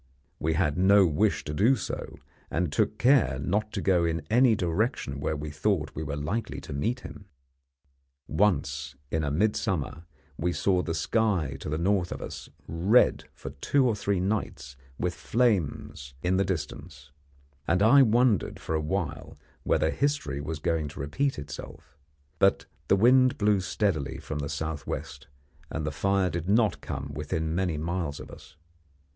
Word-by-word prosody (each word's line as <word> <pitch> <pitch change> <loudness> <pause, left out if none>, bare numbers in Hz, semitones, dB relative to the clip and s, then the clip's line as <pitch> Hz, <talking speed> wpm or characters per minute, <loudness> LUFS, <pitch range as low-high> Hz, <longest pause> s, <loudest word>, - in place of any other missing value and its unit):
We 80 +1 0
had 80 -1 0
no 100 +1 +6
wish 75 -4 +1
to 75 - -4
do 110 - +4
so, 105 - -5 0.3
and 85 -2 -1
took - - +1
care 125 - +4
not 105 +10 -1
to - - -2
go 90 -3 +3
in 85 -1 -1
any 120 0 +5
direction 90 - -1
where 75 +2 -1
we 75 0 -5
thought 80 0 -1
we - - -5
were 70 -2 -3
likely 80 +11 -3
to - - -8
meet 115 - -1
him. 100 - -10 1.0
Once 70 -6 0 0.2
in 80 - 0 0.2
midsummer 90 -6 -1 0.3
we 90 +2 0
saw 90 -1 +2
the 80 -2 -3
sky 90 - 0
to - - -6
the 75 - -1
north 90 +1 +1
of - - -4
us - - -8 0.2
red 95 +9 +3
for - - -8
two 135 - +1
or 115 - +1
three 100 -2 -1
nights 90 -9 -3 0.2
with - - -1
flames 90 - -1
in 90 +1 +2
the 100 - +2
distance, 75 -4 -5 0.6
and 90 +4 +3
I 135 +6 +7
wondered 120 -3 +2
for - - -4
a 80 - +1
while 75 -2 -3 0.2
whether 80 - +1
history 110 - -1
was 80 +2 -4
going 80 -1 -1
to 75 - -10
repeat 80 - -1
itself; 70 -1 -9 0.4
but - - +3 0.2
the - - +5
wind 130 +5 +5
blew 105 -1 +3
steadily 90 -8 -1
from 75 - -5
the 70 -1 -3
south 75 0 -4
west, 70 -2 -6 0.4
and 80 -1 -3
the 75 - -1
fire 95 +3 +1
did 85 +2 -4
not 110 0 +2
come 70 +1 -5
within 80 +2 -2
many 90 -3 0
miles 80 -2 -3
of - - -10
us. - - -14
85 Hz, 165 wpm, -27 LUFS, 75-105 Hz, 1.0 s, I